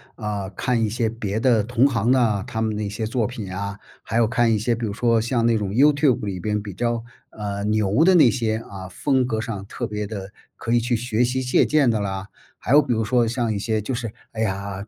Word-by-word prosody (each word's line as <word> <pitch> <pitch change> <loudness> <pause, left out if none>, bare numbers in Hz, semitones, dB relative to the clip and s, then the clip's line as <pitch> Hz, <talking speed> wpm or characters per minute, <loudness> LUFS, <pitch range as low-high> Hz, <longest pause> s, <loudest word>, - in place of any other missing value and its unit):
啊， 105 -3 -4
看 120 +4 0
一 110 - +2
些 115 0 0
别 110 -3 -4
的 115 -1 +3
同 120 +4 +2
行 120 -3 +2
啊， 115 -6 +2
他 110 - -3
们 110 -1 -1
的 105 - -3
一 100 - -2
些 110 +2 -3
作 115 0 0
品 105 -7 -7
啊， 100 +1 -4 0.2
还 110 - -6
有 115 - +4
看 115 0 +2
一 - - +2
些 115 +3 0
比 115 0 -3
如 100 - -3
说 115 0 +2
像 115 +1 0
那 115 -1 +3
种 105 -2 -2
YouTube 140 -1 +3
里 95 -3 -4
边 105 +3 -1
比 100 -2 -7
较， 120 +2 -1 0.3
呃， 100 -1 -4
牛 105 +6 +2
的 185 0 +6
那 135 -8 +6
些， 110 -3 -1
啊， 95 -2 -8
风 130 +5 +1
格 110 -3 -1
上 105 -4 -5
特 - - -5
别 105 -1 -4
的， 100 -2 -7 0.2
可 115 - -5
以 120 - +4
去 120 +1 0
学 120 0 0
习、 130 +2 -1
借 125 - +3
鉴 150 -4 +3
的 110 - 0
啦。 95 0 -4 0.3
还 - - -5
有 150 +2 +8
比 130 -3 -1
如 110 - 0
说 120 +1 +2
像 115 -1 -1
一 100 - -2
些 110 0 -1
就 130 +6 -4
是， 115 -2 -3 0.2
哎 110 - -5
呀， 100 -1 -3
110 Hz, 290 characters per minute, -23 LUFS, 105-120 Hz, 0.3 s, 有